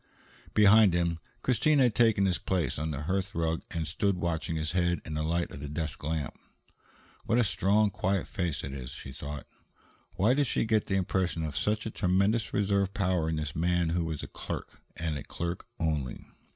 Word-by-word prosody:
Behind 105 -2 +7
him, 85 -1 +1 0.2
Christine 145 +4 +3
had 125 -5 +4
taken 110 -4 +4
his 90 -3 +1
place 85 -9 -1
on 80 +1 -2
the 75 -1 -3
hearth 95 +3 -1
rug 80 0 0
and 80 -2 -3
stood 100 +5 0
watching 85 -1 -2
his 80 0 -1
head 85 -1 +1
in 80 - -5
the 75 - -1
light 85 +2 0
of - - -8
the 70 +1 -6
desk 75 0 -3
lamp. 80 -1 -2 0.9
"What 115 - +2
a 120 - +5
strong, 105 0 +3
quiet 95 +1 0
face 90 -7 -2
it 70 - -5
is," 65 -3 -6
she 65 - -8
thought. 70 +1 -6 0.7
Why 100 +7 +4
did 140 0 +2
she - - +1
get 110 -1 +1
the 95 - 0
impression 90 -3 0
of 75 -2 -4
such 105 +1 0
a 110 - -3
tremendous 100 +5 +1
reserve 100 -1 +1
power 90 -5 +1
in 80 - 0
this 75 -1 -3
man 85 +1 +1
who 85 +1 +1
was 80 -2 -4
a - - -5
clerk, - - -6 0.2
and 80 -3 -2
a - - -7
clerk 85 +1 -4
only? 75 -6 -2
85 Hz, 200 wpm, -29 LUFS, 80-100 Hz, 0.9 s, Behind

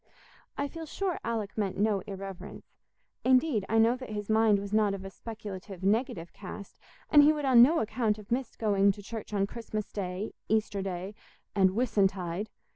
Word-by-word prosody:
I 285 - 0
feel 325 +2 -8
sure 380 +2 -2
Alick 220 -4 -3
meant 200 -3 -1
no 205 0 +2
irreverence; 195 -2 -8 0.6
indeed, 255 -4 +3
I 225 - +2
know 225 +2 +5
that 255 -2 -9
his 210 0 -3
mind 220 -1 +5
was 200 +1 -6
not 210 -2 +3
of 195 -1 -8
a 195 - -7
speculative, 200 -4 -8
negative 205 -4 0
cast, 200 +1 -9 0.3
and 295 - +9
he 295 +1 +7
would 300 -2 -2
on 255 -3 +7
no 315 +7 +6
account 220 -1 0
have 210 0 -13
missed 250 0 -2
going 200 -2 +3
to 205 - -12
church 220 +1 -7
on 200 -1 +1
Christmas 215 -1 -5
Day, 190 +1 -4 0.2
Easter 215 -2 +1
Sunday, 190 +1 -4 0.4
and 190 -2 +3
"Whissuntide." 200 -4 0
210 Hz, 180 wpm, -29 LUFS, 195-235 Hz, 0.6 s, and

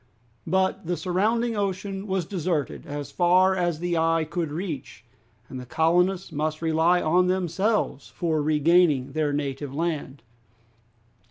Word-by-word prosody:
But 190 +1 0
the 175 0 -1
surrounding 220 +6 0
ocean 195 0 -3
was 190 -3 -1
deserted 170 -5 -3
as 145 0 -6
far 185 +2 +4
as 175 -3 0
the 175 +1 -1
eye 165 0 +2
could 165 -1 -3
reach, 150 - -6 0.4
and 130 - -7
the 125 - -8
colonists 180 +5 +1
must 155 +1 -2
rely 165 +2 +2
on 180 +3 +3
themselves 185 -2 0
for 160 -3 -1
regaining 150 -2 +3
their 150 0 0
native 140 -1 -3
land. 150 -5 -3
170 Hz, 135 wpm, -25 LUFS, 150-185 Hz, 0.4 s, far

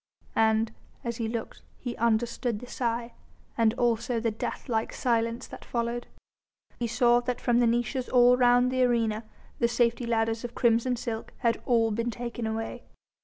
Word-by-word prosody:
And 220 0 +2 0.3
as 235 -1 -3
he 230 - -2
looked 225 0 -5 0.2
he 245 -2 -5
understood 235 0 0
the 250 - -9
sigh, 235 -1 -2 0.4
and 225 -1 +3
also 235 0 +1
the 230 0 0
death 215 - -5
like 225 -3 -1
silence 230 -1 0
that - - -10
followed. 235 0 -2 0.7
He 240 - 0
saw 240 +1 +4
that 245 0 -3
from 240 -1 +2
the 240 - +4
niches 240 +2 0
all 245 0 +6
round 245 0 +4
the 255 0 +1
arena 230 -3 +1 0.3
the 235 - +3
safety 235 0 +1
ladders 225 0 0
of 240 0 -6
crimson 235 +1 +2
silk 230 -1 -5
had 235 -1 0
all 230 -2 +3
been 230 +3 -1
taken 235 -1 -4
away. 225 0 -4
235 Hz, 170 wpm, -28 LUFS, 225-245 Hz, 0.7 s, all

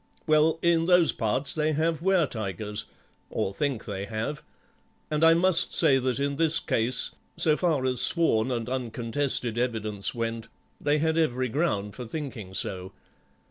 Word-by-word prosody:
Well, 155 +1 +3
in 170 -1 +3
those 180 -2 +5
parts 115 +5 0
they 155 0 0
have 160 +1 0
were 185 -2 +3
tigers, 105 -3 -4 0.4
or 95 - -2
think 135 -1 -2
they 100 -2 -4
have, 110 +8 -4 0.7
and 150 +1 0
I 165 0 +7
must 175 0 +2
say 140 -5 +4
that 130 0 -1
in 140 0 -1
this 165 0 +3
case, 120 +3 0 0.3
so 155 -2 +3
far 155 -6 0
as 125 -2 +2
sworn 130 -9 +2
and 120 -2 -2
uncontested 125 -1 -2
evidence 110 -5 -1
went, 115 -1 -3 0.3
they 145 +1 +2
had 160 +1 +1
every 130 -5 0
ground 105 -8 -1
for 125 -2 -8
thinking 115 -9 -6
so. 95 0 -3
130 Hz, 155 wpm, -27 LUFS, 110-155 Hz, 0.7 s, I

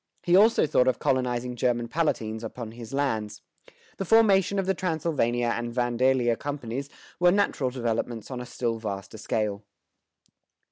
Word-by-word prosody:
He 175 0 +3
also 215 +1 +5
thought 130 -4 +2
of 130 - +2
colonizing 125 -1 -1
German 120 -1 0
Palatines 115 -7 -1
upon 115 0 -6
his 115 -1 -10
lands. 110 -7 -2 0.5
The - - -2
formation 200 -1 +4
of 195 - 0
the 190 - +2
Transylvania 155 -10 0
and 120 0 -3
Vandalia 120 0 +2
companies 140 -1 -4 0.3
were 175 0 +5
natural 185 -9 +1
developments 120 -2 -3
on 125 -1 -4
a 125 - -8
still 115 -2 -2
vaster 100 0 -6
scale. 105 -1 -2
125 Hz, 145 wpm, -26 LUFS, 115-150 Hz, 0.5 s, also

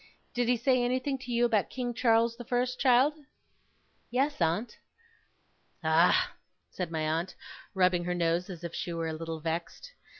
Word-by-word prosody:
Did 245 -1 0
he 245 0 +3
say 255 +1 +2
anything 255 +2 -1
to 250 -1 -7
you 240 0 +3
about 220 -4 +1
King 245 -2 -3
Charles 230 -1 +3
the 240 - -8
First, 250 +1 -1
child?' 260 +3 +5 1.0
'Yes, 270 0 0
aunt.' 170 +9 0 1.0
'Ah!' 175 - +4 0.4
said 180 -3 -4
my 160 -1 -2
aunt, 160 +4 -1 0.4
rubbing 180 -2 +3
her 180 0 -1
nose 170 +1 0
as 175 -2 -8
if 170 -1 -5
she 175 - -4
were 165 -1 -2
a - - -3
little 165 0 -5
vexed. 170 - -4
225 Hz, 165 wpm, -29 LUFS, 170-250 Hz, 1.0 s, child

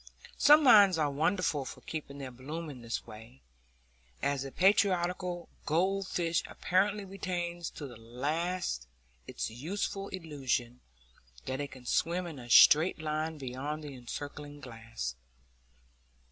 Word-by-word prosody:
Some 295 +1 +7
minds 205 - +8
are 150 -2 +1
wonderful 155 0 +1
for - - -9
keeping 150 -3 -6
their 135 -2 -6
bloom 150 +6 -6
in 130 -3 -11
this 115 0 -4
way, 115 +3 -13 0.8
as 140 -1 0
a 135 - -7
patriarchal 180 -2 +2 0.2
goldfish 175 0 +1
apparently 200 +3 0
retains 175 -3 -4
to 150 - -8
the 120 -4 -9
last 140 - -2 0.4
its - - -4
youthful 195 - -3
illusion 135 -9 -3 0.6
that 130 +2 -3
it 140 - -4
can 130 -2 -13
swim 175 +7 +1
in 160 -5 -7
a 120 -1 -10
straight 155 +8 +7
line 155 0 -2
beyond 140 +3 -4
the 145 -2 -7
encircling 145 +3 -7
glass. 115 - -6
150 Hz, 130 wpm, -31 LUFS, 130-180 Hz, 0.8 s, minds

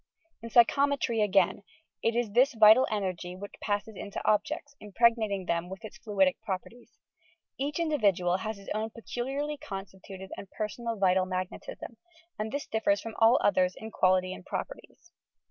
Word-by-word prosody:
In 230 - -7
Psyehometry, 240 0 +3
again, 195 -1 +2 0.4
it 230 - +1
is 240 -3 0
this 255 +4 +4
vital 220 +4 +7
energy 185 -4 -3
which 200 +2 -9
passes 205 +1 -2
into 200 +1 -6
objects, 280 +7 0
impregnating 210 -2 +1
them 170 0 -1
with 190 +4 -8
its 270 +5 -11
fluidic 195 -5 +1
properties. 210 +5 -7 0.6
Each 290 +2 -2
individual 200 - +2
has 215 +2 -4
his 195 - -12
own 215 +1 -2
peculiarly 270 +6 -4
constituted 190 -3 -9
and 195 - -9
personal 230 +3 -4
vital 185 -1 +3
magnetism, 185 +5 -5 0.4
and 215 +1 -3
this 285 +2 -3
differs 300 +8 +1
from 225 - -7
all 225 +2 +6
others 185 -2 +3
in 220 0 -8
quality 185 -1 +2
and 185 - -10
properties. 345 - -7
215 Hz, 150 wpm, -29 LUFS, 190-240 Hz, 0.6 s, vital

